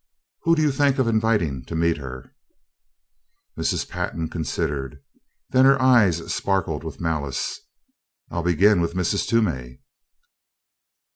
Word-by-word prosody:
Who 165 0 +5
do 155 - +1
you 150 - +3
think 140 0 +2
of 130 -3 +1
inviting 110 - +1
to 80 - -6
meet 85 0 +1
her?" 65 -3 -9 1.2
Mrs. - - -1
Pantin 80 -1 -4
considered. 70 -3 -3 0.5
Then 130 0 +5
her 135 0 +5
eyes 105 -11 +3
sparkled 90 -6 -1
with 80 -3 -7
malice, 75 -6 -2 0.7
"I'll 85 - -2
begin 90 +3 +3
with 85 +1 -2
Mrs. 95 +2 0
Toomey." 70 - -1
85 Hz, 125 wpm, -23 LUFS, 75-115 Hz, 1.2 s, Who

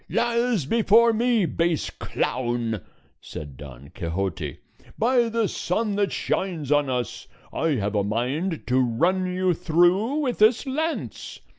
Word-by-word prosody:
"Lies 235 - +1
before 230 - +4
me, 230 -2 +2
base 165 -1 0
clown!" 120 -4 -2 0.4
said 75 -3 -8
Don 70 0 -11
Quixote. 85 -3 -3 0.4
"By 240 0 +3
the 225 -1 +1
sun 205 +4 -1
that 200 -1 +1
shines 165 -7 -2
on 145 -2 +3
us, 125 -4 -3 0.3
I 160 -3 +1
have 105 -3 -2
a 105 -1 +1
mind 130 - -2
to 125 +1 +2
run 175 +10 +1
you 185 0 +1
through 175 - +2
with 250 -5 -2
this 220 +6 +4
lance. 315 +5 -3
175 Hz, 135 wpm, -24 LUFS, -, 0.4 s, before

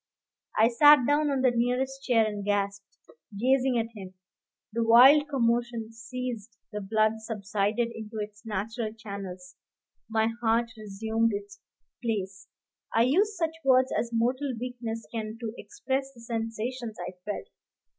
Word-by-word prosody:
I 220 - +6
sat 290 +2 +7
down 295 +2 +2
on 275 -2 0
the 255 -1 +4
nearest 250 +3 0
chair 235 -5 +3
and 210 -2 -3
gasped, 200 0 -1 0.5
gazing 260 +1 +3
at 230 0 -2
him. 190 -2 -9 0.6
The 230 0 +1
wild 265 +6 +7
commotion 235 -3 0
ceased; 235 -2 -6
the 210 -1 -4
blood 215 +2 +1
subsided 220 +1 -1
into 220 0 -8
its 210 0 -6
natural 220 +1 -3
channels; 195 -4 -8 0.5
my 220 0 +2
heart 230 0 +2
resumed 220 +2 -1
its 200 0 -8 0.4
place. 200 -5 -3 0.4
I 225 - +4
use 390 - +2
such 325 -1 0
words 260 -1 +4
as 235 - 0
mortal 250 +4 0
weakness 235 -2 -5
can 220 -1 -4
to 225 -2 -4
express 270 -9 -3
the 235 - -14
sensations 230 0 -4
I 180 - -4
felt. 210 - -5
230 Hz, 140 wpm, -28 LUFS, 215-250 Hz, 0.6 s, sat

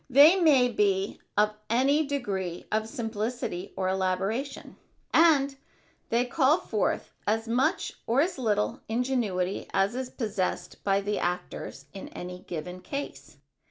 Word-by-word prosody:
They 285 +7 +8
may 300 -9 +5
be 200 -4 +1 0.2
of 210 0 +4 0.2
any 275 +6 +3
degree 195 -11 -3
of 215 0 0
simplicity 225 -4 -3
or 190 -1 0
elaboration, 190 +8 -1 0.4
and 290 -4 +5 0.5
they 235 +2 +2
call 280 +3 +3
forth - - -1
as 225 +2 +1
much 265 +10 +1
or 235 +4 +2
as 340 -2 -1
little 210 -4 0
ingenuity 225 -6 -1
as 195 +3 +2
is 255 0 -3
possessed 195 -7 -3
by 195 0 +2
the 205 +1 -1
actors 175 -5 -4
in 195 - -7
any 180 0 -7
given 180 +1 -6
case. 150 - -6
220 Hz, 130 wpm, -28 LUFS, 190-265 Hz, 0.5 s, They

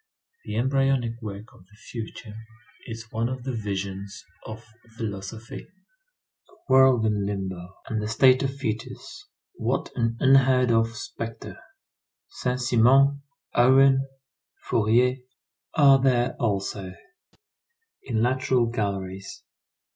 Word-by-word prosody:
The 105 - -5
embryonic 130 -1 0
work 105 0 -8
of 90 - -20
the 105 - -22
future 115 -1 -8 0.5
is 115 -1 -8
one 115 +1 -1
of 130 -1 -6
the 130 0 -4
visions 100 -2 -5 0.2
of 110 +1 -9 0.3
philosophy. 110 +1 -7 0.8
A - - -23
world 130 -3 +5
in 105 -2 0
limbo, 95 -2 -5
in 110 - -2
the 105 - -3
state 130 +3 +4
of 135 - 0
fœtus, 120 -5 -4 0.5
what - - -2
an 115 -1 -1
unheard 130 -2 +4
of 115 0 +1
spectre! 115 +1 -7 0.7
Saint 125 0 -3
Simon, 130 +4 +4 0.3
Owen, 135 +2 +5 0.6
Fourier, 120 +4 +2 0.6
are 140 -3 +6
there 125 -1 +2
also, 100 -4 -2 1.1
in 115 -3 -1
lateral 130 -1 +1
galleries. 100 -4 -4
115 Hz, 110 wpm, -25 LUFS, 105-130 Hz, 1.1 s, are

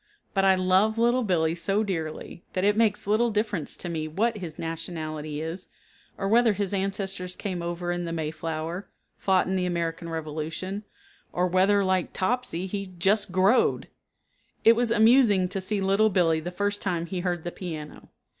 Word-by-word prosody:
But 195 - +2
I 190 -1 +5
love 185 +4 +3
Little 240 +2 +3
Billee 165 -6 +1
so 195 +5 +1
dearly 170 -3 -5
that 185 - -1
it 205 +1 +4
makes 215 -2 +2
little 215 +4 +2
difference 210 -6 0
to - - -6
me 160 -2 -3
what 215 +7 0
his 165 -4 -7
nationality 155 -2 -4
is 165 +3 -6 0.5
or 195 - -2
whether 230 +1 +4
his 200 -1 -2
ancestors 195 -2 -2
came 185 -4 -4
over 175 +1 -3
in 175 0 -2
the 165 - -4
Mayflower, 160 +3 -4 0.3
fought 190 -1 +3
in 190 - -1
the 180 -1 0
American 170 -1 -2
revolution, 160 +5 -4 0.5
or 180 - +1
whether, 190 +3 +3
like 185 -2 0
Topsy, 190 -4 -1
he 195 +1 -4
"just 200 +3 +2
growed." 190 +6 +3 0.8
It 230 - +8
was 240 0 +1
amusing 220 -4 +5
to 195 +1 -3
see 200 +1 -1
Little 195 +3 +3
Billee 170 -5 +2
the 165 +3 -5
first 205 +3 -2
time 175 -3 -1
he 180 +2 -4
heard 175 -2 -2
the 175 - -4
piano. 155 -5 -8
185 Hz, 175 wpm, -26 LUFS, 170-205 Hz, 0.8 s, It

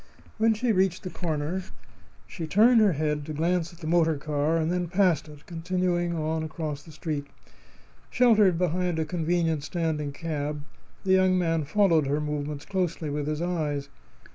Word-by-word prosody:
When 220 0 +4
she 235 +2 +1
reached 185 -2 +1
the 185 - -5
corner 165 +1 -2 0.6
she 165 -4 -6
turned 225 +7 +5
her 205 -4 +4
head 150 0 -1
to 155 - -4
glance 170 +2 0
at 170 0 -17
the - - -7
motor 165 -1 +2
car, 150 +2 0
and 160 +1 0
then 180 -1 -1
passed 180 -4 +2
it, 150 0 -14
continuing 175 0 -1
on 160 0 -1
across 155 -2 -4
the 160 - -14
street. 150 -2 -4 0.8
Sheltered 215 -8 +4
behind 180 0 0
a 160 - 0
convenient 165 -2 0
standing 155 -3 -2
cab, 150 -1 -4 0.4
the 190 - 0
young 185 0 +4
man 165 -3 +1
followed 165 -3 +3
her 145 +2 0
movements 150 0 -4
closely 175 -5 -2
with 145 0 -2
his 155 +2 -2
eyes. 150 -5 -2
165 Hz, 165 wpm, -27 LUFS, 150-180 Hz, 0.8 s, turned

